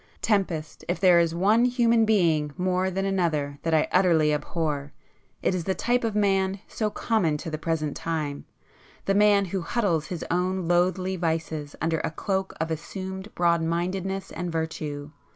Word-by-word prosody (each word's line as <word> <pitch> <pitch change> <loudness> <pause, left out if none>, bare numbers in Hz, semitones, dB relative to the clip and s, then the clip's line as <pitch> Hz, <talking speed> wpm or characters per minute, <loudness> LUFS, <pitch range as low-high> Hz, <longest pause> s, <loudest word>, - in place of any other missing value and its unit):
Tempest, 180 -7 -1
if 175 - -1
there 180 -3 +6
is 170 -1 +1
one 210 +7 +4
human 235 -2 +3
being 165 -9 +2
more 185 +1 +1
than 195 +1 -2
another 155 -7 0
that 165 -1 +1
I 155 - +3
utterly 165 -5 +4
abhor, 150 -2 -2 0.5
it - - +2
is 175 -3 -2
the 190 - 0
type 245 +1 +1
of 225 -2 -1
man 195 -2 +2
so 215 -2 -2
common 200 -9 0
to 160 +2 -6
the 155 - -3
present 155 -3 -2
time, 155 -4 -3 0.6
the 195 - +2
man 205 0 +4
who 190 +1 -3
huddles 170 -4 0
his 175 -3 -5
own 180 0 0
loathly 185 +2 +1
vices 160 -3 -2
under 160 0 0
a - - -2
cloak 190 +4 -2
of 160 +1 -2
assumed 190 +5 -6
broad 170 -1 +3
mindedness 185 +4 -2
and 175 0 -4
virtue. 155 -3 -4
175 Hz, 170 wpm, -26 LUFS, 160-195 Hz, 0.6 s, there